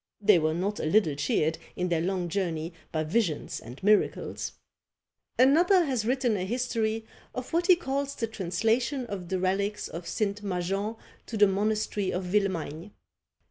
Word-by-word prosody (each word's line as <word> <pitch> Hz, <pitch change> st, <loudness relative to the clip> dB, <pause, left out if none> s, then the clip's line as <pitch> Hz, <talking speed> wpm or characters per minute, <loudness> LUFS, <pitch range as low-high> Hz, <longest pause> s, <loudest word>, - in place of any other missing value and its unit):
They 210 Hz, -3 st, +5 dB
were 155 Hz, 0 st, +1 dB
not 200 Hz, +4 st, -1 dB
a -, -, -2 dB
little 160 Hz, -2 st, +3 dB
cheered 150 Hz, +3 st, 0 dB, 0.2 s
in 180 Hz, 0 st, -1 dB
their 165 Hz, -2 st, +1 dB
long 180 Hz, 0 st, -1 dB
journey 170 Hz, -2 st, -2 dB, 0.2 s
by 155 Hz, -1 st, 0 dB
visions 165 Hz, -1 st, -1 dB
and 125 Hz, +9 st, -11 dB
miracles. 210 Hz, +1 st, +1 dB, 0.8 s
Another 340 Hz, +8 st, +5 dB
has 255 Hz, -7 st, -1 dB
written 250 Hz, -2 st, +1 dB
a 185 Hz, -, -1 dB
history 225 Hz, 0 st, -1 dB, 0.3 s
of 255 Hz, +3 st, -5 dB
what 345 Hz, +1 st, +2 dB
he 365 Hz, -, +8 dB
calls 280 Hz, -4 st, -2 dB
the 230 Hz, -, -1 dB
translation 225 Hz, -, 0 dB
of 190 Hz, -6 st, -6 dB
the 190 Hz, -, 0 dB
relics 200 Hz, +3 st, 0 dB
of 170 Hz, +1 st, -7 dB
St. 205 Hz, -2 st, -1 dB
Majean 195 Hz, +3 st, -2 dB, 0.3 s
to 225 Hz, -, -4 dB
the 205 Hz, -, +7 dB
monastery 205 Hz, 0 st, 0 dB
of 180 Hz, -, -2 dB
Villemagne. 185 Hz, -2 st, -1 dB
200 Hz, 160 wpm, -28 LUFS, 180-230 Hz, 0.8 s, he